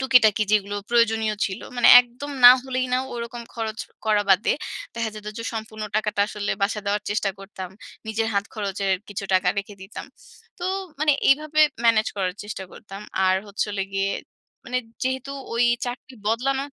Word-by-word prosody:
টুকিটাকি 235 -5 +5
যেগুলো 205 -1 +2
প্রয়োজনীয় 225 -2 +3
ছিলো। 190 +2 -4
মানে 245 - +5
একদম 250 +4 -8
না 245 - +13
হলেই 255 -1 -1
না 255 - +3
ওরকম 235 0 -5
খরচ 220 -1 -4 0.3
করা 210 -1 +3
বাদে 190 +3 +4 0.4
দেখা 230 -1 -2
যেতো 210 0 -7
যে 230 - -4
সম্পূর্ণ 220 -1 -6
টাকাটা 210 -1 0
আসলে 205 -2 -3
বাসায় 210 +1 0
দেওয়ার 205 +1 0
চেষ্টা 205 -1 0
করতাম। 195 -2 -8 0.4
নিজের 225 +1 -1
হাত 200 - +1
খরচের 200 -2 -1 0.2
কিছু 200 0 -5
টাকা 185 -1 +3
রেখে 200 +1 -5
দিতাম। 190 +3 -8 0.5
তো 350 - -5 0.4
মানে 305 -1 +4 0.2
এইভাবে 305 +2 +3 0.2
manage 220 -2 +4
করার 185 -2 -1
চেষ্টা 205 -2 -6
করতাম। 195 -2 -10 0.3
আর 185 0 +4
হচ্ছে 205 +1 -2
হলো 200 -1 -1
গিয়ে 195 0 0 0.5
মানে 255 0 -1 0.2
যেহেতু 260 +1 -2 0.2
ঐ - - -3 0.3
চাকরি 250 +1 -7
বদলানো 265 +5 +1
220 Hz, 165 wpm, -24 LUFS, 200-245 Hz, 0.5 s, না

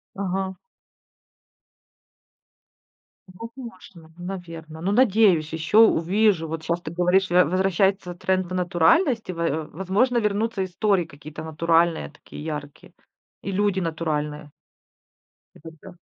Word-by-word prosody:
Ага. 190 -1 -2 2.7
Возможно. 190 -6 -11
Наверно. 165 -3 -8
Ну, 195 +4 -1
надеюсь, 205 -9 +3
еще 160 +7 +1
увижу. 195 -4 +4
Вот 160 0 -5
щас 170 +2 -2
ты 155 - -6
говоришь, 180 +1 +2
во 180 +1 +5
возвращается 190 +1 +1
тренд 185 +1 -1
в - - -4
натуральность 185 - +2
и, - - -3
во 165 -2 -2
возможно, 200 +8 +1
вернутся 210 -1 0
истории 185 0 +1
какие-то 150 0 -10
натуральные, 165 +1 +1
такие 155 - -12
яркие. 150 -2 -7 0.5
И 195 - -4
люди 200 -1 +1
натуральные. 150 -3 -3 1.1
И - - -17
тогда 165 +3 -12
180 Hz, 110 wpm, -24 LUFS, 160-195 Hz, 2.7 s, во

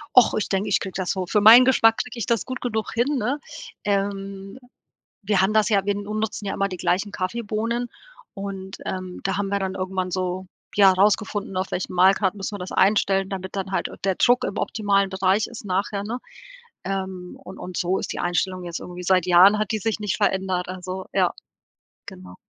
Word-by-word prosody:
Ach, 250 - +7
ich 215 - -2
denke, 195 +2 0
ich - - +3
kriege 190 - -4
das 185 -2 -1
so 185 -2 -2
für 210 - +1
meinen 230 +4 +10
Geschmack 225 -3 +4
kriege 250 -1 -4
ich - - -2
das 230 -4 0
gut 255 0 -5
genug 220 -3 -2
hin, 260 +5 +1
ne? 250 +6 -1 0.5
Ähm, 195 +1 -3 0.6
wir 195 -1 +2
haben 195 +3 +2
das 215 0 +3
ja 200 -3 +3
wir 205 0 +1
n 205 - -5
nutzen 215 0 -3
ja 195 - -2
immer 195 - 0
die 185 - -6
gleichen 190 +4 0
Kaffeebohnen 230 +4 -2 0.5
und, 195 -1 -6
ähm, 185 -1 -5
da 195 0 -1
haben 200 -1 -1
wir 200 - 0
dann 190 -1 -2
irgendwann 185 -1 -3
so, 185 0 -2 0.3
ja, 195 -2 +7
rausgefunden, 205 0 +1
auf 185 - -2
welchen 185 - -3
Mahlgrad 190 +2 +4
müssen 200 +1 -5
wir - - -7
das 180 - -6
einstellen, 195 -1 +2
damit 190 0 -6
dann 195 0 -3
halt, - - 0
äh, - - -11
der 190 -2 +1
Druck 245 +1 +3
im 200 - -3
optimalen 200 -2 +1
Bereich 190 +2 +1
ist 235 -3 -10
nachher, 200 +2 -1
ne? 235 +4 -4 0.6
Ähm, 190 -2 -5
und 190 - -10
und 180 -1 -7
so 180 +2 0
ist - - -4
die - - -5
Einstellung 185 +1 -1
jetzt 170 -1 -5
irgendwie 180 0 -8
seit 185 -1 +2
Jahren 190 +4 +7
hat 215 +1 -1
die 220 - 0
sich 220 +2 -2
nicht 210 -2 -2
verändert, 190 -2 0
also 185 0 -6
ja, - - +3 0.8
genau. 90 0 -11
195 Hz, 210 wpm, -23 LUFS, 185-210 Hz, 0.8 s, meinen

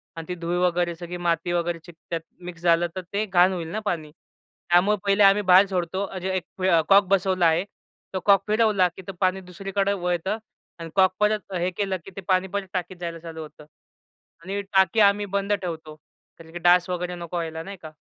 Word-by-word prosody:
आणि 165 +1 -8
ती 180 - -2
धुळ 170 +1 -3
वगैरे 175 -1 0
सगळी 175 +1 -7
माती 170 0 -1
वगैरे 170 -1 -1
चिकटात. 170 0 -16
त्यात 165 -1 -2 0.2
मिक्स 170 -2 -8
झालं, 170 0 +3
तर 185 - -3
ते 210 +2 0
घाण 185 -1 +4
होईल 170 -3 -4
ना 215 - -2
पाणी. 155 -5 -2 0.6
त्यामुळे 195 +4 +4
पहिले 200 +1 +4
आम्ही 200 +1 +6
बाहेर 190 +2 +8
सोडतो. 185 +1 -2
अ, 190 - -8
जे 190 +1 -3
एक 185 +1 -9 0.3
कॉक 195 0 +7
बसवला 185 -2 +2
आहे 165 +3 +3 0.5
तो 185 - -1
कॉक 200 -1 +6
फिरवला, 215 -4 +3
की - - -9
ते - - -3
पाणी 185 +1 +1
दुसरीकडे 195 +2 -2
वळतं 180 +2 -1 0.4
आणि 165 0 -7
कॉक 190 -1 +4
परत 210 -2 0
हे 180 0 0
केलं, 195 0 -2
की 195 - -10
ते 195 - -6
पाणी 185 0 +2
परत 200 -1 -2
टाकीत 180 0 -4
जायला 170 -1 -5
चालू 160 -1 -8
होतं. 150 -1 -12 0.8
आणि 200 +2 -3
टाकी 190 +3 +4
आम्ही 205 0 +4
बंद 200 +1 0
ठेवतो, 160 -5 -5 0.4
कारण 160 0 -14
की 175 - -5
डास 175 +1 +4
वगैरे 180 0 -3
नको 175 0 -7
व्हायला 160 -1 -4
नाही 195 +1 -8
का. 155 -1 -9
180 Hz, 205 wpm, -24 LUFS, 170-195 Hz, 0.8 s, बाहेर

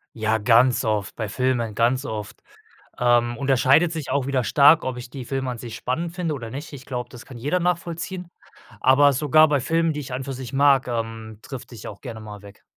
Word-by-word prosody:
Ja, 110 0 0
ganz 120 +3 +4
oft 105 -3 -1
bei 110 -3 -4
Filmen, 120 -1 -1
ganz 120 +4 +2
oft. 110 -5 -6 0.6
Ähm, 120 -1 +2
unterscheidet 135 +5 +3
sich 160 -5 -5
auch 140 -1 0
wieder 135 -3 0
stark, 145 +7 +5
ob 130 -1 -3
ich 120 - -8
die 130 0 -8
Filme 135 0 -3
an 125 - -5
sich 115 -1 -8
spannend 165 +9 -3
finde 175 -4 -2
oder 120 -5 -7
nicht. 145 +4 -7
Ich 130 - -10
glaube, 125 -3 -5
das 120 -1 -12
kann 125 - -11
jeder 145 +9 0
nachvollziehen, 175 +1 -3 0.5
aber 140 +2 +5
sogar 155 +3 +5
bei 145 -2 +1
Filmen, 165 +3 +1
die 150 - -4
ich 130 -2 -8
an 125 - -2
und 130 - -6
für 135 - -5
sich 130 0 -8
mag, 135 -2 +4
ähm, 115 -2 -5
drifte 125 0 -9
ich 110 - -8
auch 100 - -11
gerne 115 -4 -7
mal 105 -1 -10
weg. 100 0 -15
130 Hz, 220 wpm, -23 LUFS, 115-145 Hz, 0.6 s, stark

